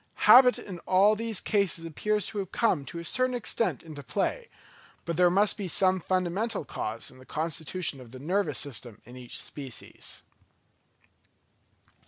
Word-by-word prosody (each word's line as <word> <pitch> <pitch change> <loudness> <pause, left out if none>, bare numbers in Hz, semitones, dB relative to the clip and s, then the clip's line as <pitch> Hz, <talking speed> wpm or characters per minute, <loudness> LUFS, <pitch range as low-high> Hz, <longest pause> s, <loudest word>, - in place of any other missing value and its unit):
Habit 250 0 +8
in 180 -3 -8
all 195 +3 +5
these 225 -2 -2
cases 200 -5 +1
appears 210 +5 -1
to 210 - -4
have 190 -2 -5
come 175 -11 +1
to 170 - -8
a 170 - -6
certain 255 +7 +1
extent 230 0 -1
into 155 -3 -9
play; 205 - -2 0.6
but 170 - -2
there 180 +1 +5
must 200 +4 +3
be 200 -3 -4
some 185 +1 +3
fundamental 185 +3 -1
cause 110 -3 -4
in 130 - -16
the - - -13
constitution 160 0 -3
of 125 - -12
the 130 - -10
nervous 160 +1 -1
system 120 -5 -3
in 120 - -12
each 125 -1 -6
species. 135 -5 -6
180 Hz, 160 wpm, -28 LUFS, 145-205 Hz, 0.6 s, Habit